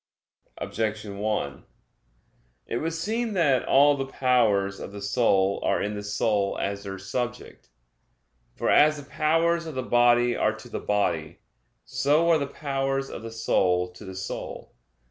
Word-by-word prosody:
Objection 110 -2 -3
1: 105 -10 -2 1.0
It - - -3
would 160 +5 -2
seem 220 +7 -2
that 145 -9 +3
all 145 +1 +5
the 135 -1 -3
powers 110 -8 +2
of - - -7
the 100 - -8
soul 100 -2 +2
are - - +1
in 105 - -2
the 105 - -5
soul 105 -1 0
as 100 0 -2
their 95 -1 -6
subject. 120 - -5 0.9
For - - 0
as 155 +1 +5
the 145 -2 -10
powers 165 +3 +1
of 155 - -7
the 130 - -2
body 120 0 +4
are 110 - +1
to 110 +2 -12
the - - -4
body; 85 -7 -1 0.4
so 155 +4 +2
are 160 - +4
the 140 - -2
powers 135 -1 -2
of - - -7
the 115 - -7
soul 90 -5 +1
to 90 +4 -13
the 95 -2 -8
soul. 95 - -6
120 Hz, 160 wpm, -26 LUFS, 100-140 Hz, 1.0 s, all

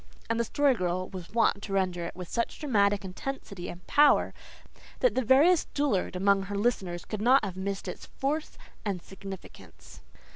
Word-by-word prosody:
and 230 - 0
the - - +3
Story 285 +4 +2
Girl 185 -3 -2
was 185 -3 -8
wont 225 -3 +2
to 200 - -6
render 185 -3 0
it - - -6
with 180 -1 -7
such 235 +6 -2
dramatic 205 -8 +2
intensity 195 -2 -6
and 175 +1 -10
power 295 0 +4 0.7
that - - +3
the 260 - +1
veriest 300 +9 +4
dullard 270 -11 0
among 195 +1 +3
her 200 +1 -4
listeners 190 -6 -1
could 215 -2 -5
not 255 +5 +5
have 185 - -5
missed 195 +1 -4
its - - -7
force 300 +3 -3 0.3
and 195 -5 -3
significance. 195 -1 -11
200 Hz, 175 wpm, -28 LUFS, 185-260 Hz, 0.7 s, not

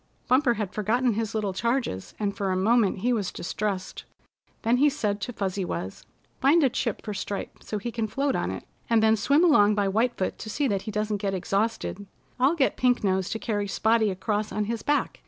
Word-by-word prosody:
Bumper 255 -1 +3
had 210 -3 -4
forgotten 230 +4 +1
his 225 +1 -3
little 205 -3 -1
charges, 235 - -2
and 205 -2 -1
for 195 -3 -1
a - - +1
moment 205 -1 +2
he 245 +3 +2
was 205 -5 -1
distressed. 195 0 -4 0.6
Then 235 +2 +3
he 290 +3 +5
said 210 -8 -2
to 220 - -3
Fuzzy 195 -3 -2
Wuzz: 95 - -5 0.3
"Find 295 +5 +4
a 265 - +3
chip 235 -4 -2
for 210 - -4
Stripe 200 0 -5
so 210 - -4
he 235 +4 -4
can 225 -1 -2
float 275 +4 0
on - - -1
it, - - -5 0.3
and 225 -1 +4
then 220 0 +5
swim 280 +9 +3
along 210 -11 +5
by 205 -1 +1
White 225 +5 +1
Foot 185 - -2
to 220 - -7
see 280 +6 0
that 200 -5 0
he - - -3
doesn't 210 0 -1
get 195 -1 -2
exhausted. 200 +1 -2 0.3
I'll 270 +6 +4
get 275 -5 +1
Pink 250 -2 +2
Nose 190 -2 +1
to - - -2
carry 205 -2 -2
Spotty 220 +2 +2
across 205 +3 -2
on 210 0 -1
his 230 +1 -3
back. 295 0 0
215 Hz, 215 wpm, -26 LUFS, 200-240 Hz, 0.6 s, he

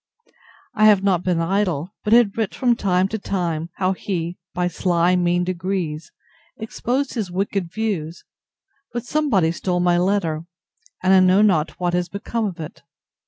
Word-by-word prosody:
I 215 - +3
have 205 -3 +6
not 185 -4 +2
been 180 -2 0
idle; 180 -2 -1
but 210 - -2
had 230 -3 +5
writ 220 -3 -2
from 245 -2 +2
time 185 -3 +1
to 220 - -3
time, 170 -5 -2
how 185 0 +1
he, 175 -2 -4
by 180 0 -1
sly 175 0 +1
mean 175 0 +1
degrees, 180 -3 -3 0.5
exposed 250 +5 -2
his 215 -7 -3
wicked 190 -1 -2
views; 185 -7 -3 0.7
but 240 0 -4
somebody 240 - +1
stole 180 +1 -2
my 175 0 +3
letter, 175 -4 0 0.6
and 185 +1 +4
I 190 - +7
know 185 +2 +5
not 170 -5 +1
what 175 -1 0
has 180 -1 0
become 220 +4 -3
of 185 -5 -5
it. 155 - -8
185 Hz, 165 wpm, -21 LUFS, 175-205 Hz, 0.7 s, I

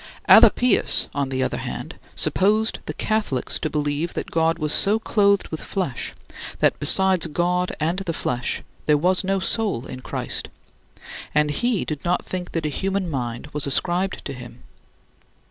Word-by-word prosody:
Alypius, 245 -4 +6
on 140 -1 -1
the 130 -1 -1
other - - -2
hand, - - -6 0.2
supposed 215 +4 +1
the - - -3
Catholics 215 - -1
to 155 - -2
believe 150 +2 -2
that - - -5
God 165 0 +1
was 155 -2 -1
so 205 +2 +4
clothed 200 -3 +2
with 160 - -5
flesh 180 - -4 0.4
that - - +2
besides 185 +4 +4
God 180 +3 0
and 165 +4 0
the 190 -3 -3
flesh 125 -6 -2 0.2
there 150 -1 +5
was 180 +6 +2
no 195 +1 0
soul 190 - -1
in 130 - -8
Christ, - - -4 0.9
and 150 0 +3
he 235 +5 0
did 150 -2 -5
not 180 +1 0
think 180 -1 -5
that 165 -2 -2
a - - 0
human 190 +2 -2
mind 120 0 -4
was 150 -1 -1
ascribed 180 +6 -1
to - - -4
him. 125 -2 -11
170 Hz, 160 wpm, -22 LUFS, 145-195 Hz, 0.9 s, Alypius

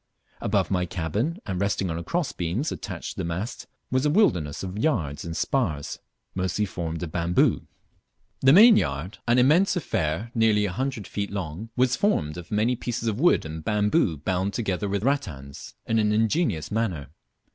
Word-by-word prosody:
Above - - 0
my 90 -2 +1
cabin, 95 - -2
and 95 -2 -3
resting 100 -3 0
on 85 +1 -4
cross 170 - -1
beams 90 - -2
attached - - -5
to - - -12
the - - -2
masts, 85 +7 -4 0.2
was 130 +1 +2
a 150 - +3
wilderness 90 - +2
of 95 0 -5
yards 80 - 0
and 85 -1 -5
spars, 85 - -1 0.3
mostly 95 +3 -1
formed 85 -3 -4
of 80 - -5
bamboo. 85 +1 +1 0.7
The 135 - +5
mainyard, 110 - +5
an 120 +1 +4
immense 155 +12 +4
affair 105 - -2
nearly 110 -3 +3
a 100 - -2
hundred 130 -1 -3
feet 100 -1 -3
long, 95 +2 -5
was 125 0 +3
formed 80 - 0
of 85 - -11
many 110 +4 +1
pieces 115 0 -3
of 110 0 -1
wood 175 - +4
and 80 0 -6
bamboo 105 - +1
bound 95 +6 -1
together 100 -3 -1
with 100 0 -1
rattans 85 - -3
in 115 0 +1
an 105 -1 +2
ingenious 110 - +1
manner. 105 -10 -2
100 Hz, 170 wpm, -25 LUFS, 85-125 Hz, 0.7 s, The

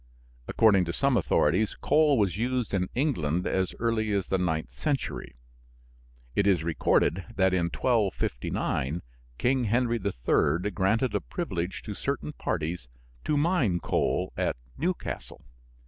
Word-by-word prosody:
According 100 -5 +4
to 85 - -3
some 140 +6 +2
authorities, 95 +1 +2
coal 150 -3 +4
was 100 -6 +1
used 125 +1 -1
in 90 -2 0
England 90 - 0
as 95 -1 0
early 110 -2 0
as 100 -3 -1
the 95 - +1
ninth 80 -3 -1
century. 145 - -3 1.0
It 100 - +2
is 90 -5 +3
recorded 85 +2 +1
that 95 -1 +3
in 90 -2 +2
1259 85 - -1 0.3
King 130 0 +1
Henry 120 +2 +1
III. 90 +4 +1
granted 105 +6 +1
a - - 0
privilege 95 - -4
to 105 - -5
certain 140 +7 -3
parties 80 - -3 0.4
to 150 - +1
mine 145 - +2
coal - - 0
at - - 0 0.2
Newcastle. 175 +4 -4
100 Hz, 130 wpm, -28 LUFS, 90-125 Hz, 1.0 s, According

